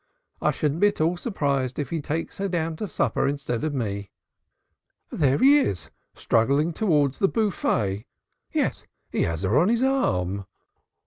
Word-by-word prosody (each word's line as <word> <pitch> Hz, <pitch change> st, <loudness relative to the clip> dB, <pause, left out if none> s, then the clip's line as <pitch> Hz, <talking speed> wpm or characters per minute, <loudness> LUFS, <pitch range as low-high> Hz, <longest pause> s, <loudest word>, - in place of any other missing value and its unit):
I -, -, +3 dB
shouldn't 150 Hz, 0 st, -1 dB
be 205 Hz, -, +6 dB
at 205 Hz, -, -2 dB
all 165 Hz, +3 st, +2 dB
surprised 140 Hz, -, -1 dB
if 145 Hz, -4 st, -3 dB
he 165 Hz, -2 st, -1 dB
takes 160 Hz, +5 st, -4 dB
her 200 Hz, -, 0 dB
down 165 Hz, -2 st, -1 dB
to 210 Hz, -, -3 dB
supper 150 Hz, -, 0 dB
instead 140 Hz, -4 st, -2 dB
of 155 Hz, -, 0 dB
me." 100 Hz, -5 st, -3 dB, 1.0 s
"There 140 Hz, -3 st, +2 dB
he 280 Hz, +4 st, +6 dB
is, 90 Hz, -, -2 dB, 0.2 s
struggling 140 Hz, +8 st, +2 dB
towards 150 Hz, -9 st, +1 dB
the 195 Hz, -, +4 dB
buffet. 110 Hz, -, 0 dB, 0.4 s
Yes, -, -, -1 dB, 0.3 s
he -, -, 0 dB
has 85 Hz, +2 st, -3 dB
her 105 Hz, +9 st, +3 dB
on 175 Hz, +6 st, +3 dB
his 235 Hz, +2 st, +2 dB
arm." 100 Hz, -, 0 dB
145 Hz, 165 wpm, -25 LUFS, 115-180 Hz, 1.0 s, be